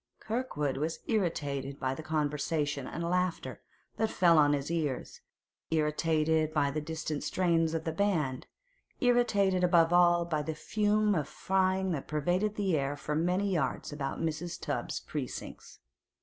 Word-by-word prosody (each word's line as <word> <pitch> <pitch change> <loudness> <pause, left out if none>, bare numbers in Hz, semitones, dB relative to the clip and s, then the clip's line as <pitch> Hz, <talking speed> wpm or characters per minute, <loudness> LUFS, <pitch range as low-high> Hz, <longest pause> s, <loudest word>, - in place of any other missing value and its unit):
Kirkwood 180 - -2
was 155 +3 -2
irritated 145 - -1
by 130 -1 -1
the 135 - -6
conversation 150 -2 -1
and 170 - -5
laughter 180 0 -1 0.4
that 220 - +1
fell 170 -3 +4
on 145 -1 +5
his 145 +2 -2
ears, 150 -6 -3 0.5
irritated 155 0 +1
by 140 -2 +2
the 155 +2 -2
distant 155 -1 -4
strains 165 -3 +1
of 160 - -2
the 160 - -2
band, 160 -8 0 0.5
irritated 205 -7 +3
above 170 -1 +4
all 175 -1 +5
by 155 -3 -1
the 155 +1 -4
fume 210 +4 +1
of 150 -5 -1
frying 190 0 +1
that 150 -5 -3
pervaded 175 +8 0
the 195 -5 +1
air 140 0 -1
for 150 - -4
many 180 +5 +1
yards 150 -2 -1
about 140 -2 -4
Mrs. 165 +1 -3
Tubbs's - - -3
precincts. - - -6
160 Hz, 150 wpm, -30 LUFS, 150-185 Hz, 0.5 s, on